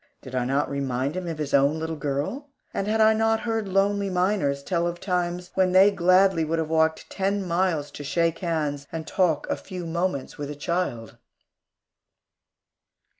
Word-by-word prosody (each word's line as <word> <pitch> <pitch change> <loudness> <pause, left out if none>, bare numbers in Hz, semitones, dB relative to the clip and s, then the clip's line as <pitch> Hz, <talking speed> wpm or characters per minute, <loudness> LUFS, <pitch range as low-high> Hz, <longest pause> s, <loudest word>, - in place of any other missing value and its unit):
Did 130 - -10
I 125 -1 0
not 135 +3 +1
remind 140 +1 -2
him 185 -1 -4
of 165 -2 -4
his 150 -2 -4
own 140 +2 +4
little 160 0 -3
girl? 150 - -3 0.2
And 195 - -2
had 220 +1 +1
I 220 0 +6
not 225 0 +1
heard 225 -3 -2
lonely 200 +1 +1
miners 180 -7 0
tell 170 0 0
of 175 0 -4
times 180 -1 -2
when 185 -1 +2
they 190 +2 +7
gladly 185 -1 +4
would 160 +1 -1
have 160 -1 -2
walked 160 0 +1
ten 195 0 -1
miles 170 -4 0
to 145 - -8
shake 165 +3 0
hands 150 -5 -2
and 160 -1 -5
talk 165 -6 +1
a - - 0
few 180 -3 -7
moments 170 -5 -2
with 145 -1 -4
a 150 - -5
child? 145 -8 -3
170 Hz, 175 wpm, -25 LUFS, 145-190 Hz, 0.2 s, they